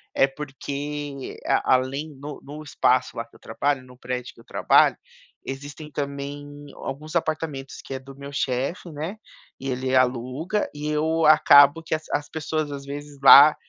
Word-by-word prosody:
é 135 - +5
porque 145 0 -6 0.3
além 130 +4 +1
no 145 +1 -7
no 150 +2 -9
espaço 145 - +1
lá - - -3
que - - -25
eu - - -17
trabalho, 140 -2 -1
no 125 -1 -16
prédio 125 0 -5
que - - -21
eu - - -21
trabalho, - - +4 0.5
existem 145 +3 -7
também 140 0 -4 0.3
alguns 150 +3 -7
apartamentos 155 -4 -2
que - - -7
é - - -4
do 135 +1 -13
meu 140 +1 -9
chefe, 135 +6 -2
né, 160 +8 -5 0.4
e 135 - -4
ele 130 0 -2
aluga 130 - 0
e 150 +1 -5
eu 160 +2 +1
acabo 150 0 +7
que 165 - -3
as 155 - -6
as 145 0 -1
pessoas 155 -1 -3
às 140 -1 -7
vezes 145 0 -8
lá 145 +2 +10
145 Hz, 165 wpm, -24 LUFS, 135-150 Hz, 0.5 s, lá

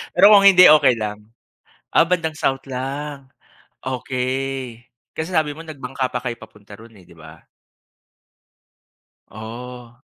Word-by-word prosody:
Pero 200 +2 +7
kung 200 -1 +7
hindi, 180 -2 +8
okey 135 -5 +5
lang. 105 -1 -4 0.8
Ah, 165 - +5
bandang 165 -3 -1
South 135 -2 -1
lang, 135 +1 -6 0.5
okey. 130 -1 -4 0.3
Kasi 160 +3 -5
sabi 150 -2 0
mo 165 - -10
nag 155 -3 -10
bangka 130 0 -3
pa 125 - -4
kayo 120 -2 -4
papunta 105 -2 -15
roon 115 0 -16
eh, 90 - -19
di - - -18
ba? 80 -1 -15 1.9
Oh. 120 +2 -10
130 Hz, 135 wpm, -20 LUFS, 115-150 Hz, 1.9 s, hindi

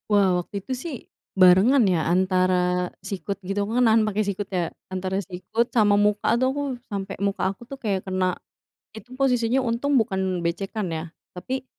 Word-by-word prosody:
Wah 195 -4 +3
waktu 175 - -13
itu 260 - -4
sih, 270 +4 -5 0.4
barengan 190 +9 +6
ya, 180 -4 +2
antara 180 0 +2 0.2
sikut 195 0 -4
gitu, 195 +2 -3
aku - - -5
kan 250 - +4
nahan 220 0 +5
pakai 215 0 0
sikut 200 0 -3
ya. 175 -3 -1 0.2
Antara 185 0 -2
sikut 185 +5 -2
sama 210 -3 +4
muka 205 0 +1
tuh 260 - +2
aku, 285 +1 -3 0.3
sampai 200 -2 -4
muka 200 0 -1
aku 195 - -14
tuh 275 - -7
kayak 195 -4 0
kena. 185 -1 0 0.6
Itu 245 +3 -11
posisinya 250 -2 +2
untung 250 +4 0
bukan 190 -4 -1
becekan 195 +4 -2
ya. 160 -1 -3 0.3
Tapi, 255 +8 -5
200 Hz, 175 wpm, -24 LUFS, 185-230 Hz, 0.6 s, barengan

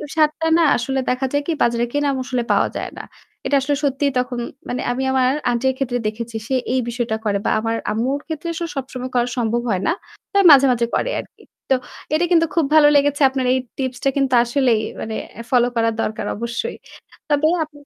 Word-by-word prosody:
স্বাদটা 310 +1 +2
না 335 - +4
আসলে 265 +3 -2
দেখা 255 +1 0
যায় 285 0 0
কি - - +1
বাজারে 235 0 +1
কেনা 290 0 +1
মসলায় 250 -2 -2
পাওয়া - - +2
যায় - - -4
না। - - -6 0.4
এটা 285 - +1
আসলে 285 +1 0
সত্যিই 280 0 +1
তখন 250 -1 -2 0.3
মানে 245 - -2
আমি 260 +2 -2
আমার 255 -1 +3 0.2
আন্টির 260 +2 +1
ক্ষেত্রে 245 -2 -1
দেখেছি। 225 +1 -5
সে 265 - 0 0.2
এই 260 - +2
বিষয়টা 235 -2 -2
করে। 200 -1 +1
বা - - +2
আমার 225 +1 -1 0.2
আম্মুর 255 +6 -1
ক্ষেত্রে 320 +1 -5
আসলে 335 0 -4
সবসময় 255 -1 -5
করা 240 0 +2
সম্ভব 235 0 0
হয় 190 -2 0
না। - - +3 0.4
তাই 400 0 +4
মাঝে 275 -1 +8
মাঝে 235 -1 +1
করে - - 0
আরকি। - - -20 0.3
তো 265 - +5 0.4
এটা 340 +3 +3
কিন্তু 330 -1 +5
খুব 325 -4 +3
ভালো 295 -1 +7
লেগেছে। 285 +1 +2
আপনার 260 -1 -2
এই 260 - +2 0.2
টিপস 260 -2 -3
টা 275 - +3
কিন্তু 270 -2 +1
আসলেই 240 -3 +2 0.2
মানে 220 0 -4 0.3
ফলো 245 -1 +4
করা 230 0 +2
দরকার 215 -1 -3
অবশ্যই। 235 - -4 0.5
তবে 295 +1 +3 0.2
আপনি 295 -1 -13
260 Hz, 200 wpm, -20 LUFS, 240-285 Hz, 0.5 s, মাঝে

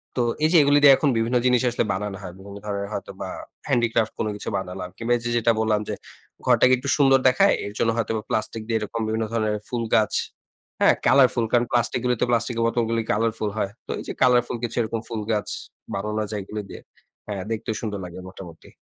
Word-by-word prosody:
তো 125 - +1 0.2
এই 155 - +5
যে, - - +7
এগুলি 145 +1 +4
দিয়ে 140 -1 +10
এখন 150 - +2
বিভিন্ন 115 +2 0
জিনিস 125 -1 +4
আসলে 120 - 0
বানানো 95 0 -4
হয়। 90 -2 -8
বিভিন্ন 100 +1 -10
ধরনের 100 -1 -3
হয়তোবা, - - -6 0.4
হ্যান্ডিক্রাফট 115 -2 +1
কোনো 110 - 0
কিছু - - -5
বানালাম, 90 -1 -5
কিংবা 115 +1 -3
এই - - -10
যে, 120 - -2
যেটা 115 0 +3
বললাম 110 -1 +2
যে, - - -1 0.5
ঘরটাকে 130 0 +5
একটু 140 +3 -4
সুন্দর 135 -2 +5
দেখায় 195 +11 +5
এর 100 - -6
জন্য 115 - +2
হয়তোবা 110 -1 -1
প্লাস্টিক 110 +1 -2
দিয়ে 115 -1 +1
এরকম 115 +2 -4
বিভিন্ন 110 +1 -1
ধরনের 110 -2 0
ফুল 120 -2 -2
গাছ, 110 - +2 0.7
হ্যাঁ? - - +6
কালারফুল, 130 -3 +5
কারণ 120 0 +3
প্লাস্টিক 120 +1 +1
গুলোতে, 125 -2 +1
প্লাস্টিকের 115 0 0
বোতলগুলি 115 -1 0
কালারফুল 110 0 0
হয়। 100 -2 -1 0.2
তো - - -4
এই - - -6
যে, - - -3
কালারফুল 125 -1 +3
কিছু 115 - -3
এরকম 115 0 -2
ফুল 115 -2 -3
গাছ 105 -3 -1 0.5
বানানো 105 +2 -2
যায় 105 -2 -3
এগুলো 105 +2 -5
দিয়ে - - -9 0.5
হ্যাঁ, 100 -3 -4
দেখতেও 110 0 -3
সুন্দর 105 -3 -3
লাগে 90 +1 -9
মোটামুটি। 90 -3 -12
115 Hz, 205 wpm, -24 LUFS, 105-120 Hz, 0.7 s, দিয়ে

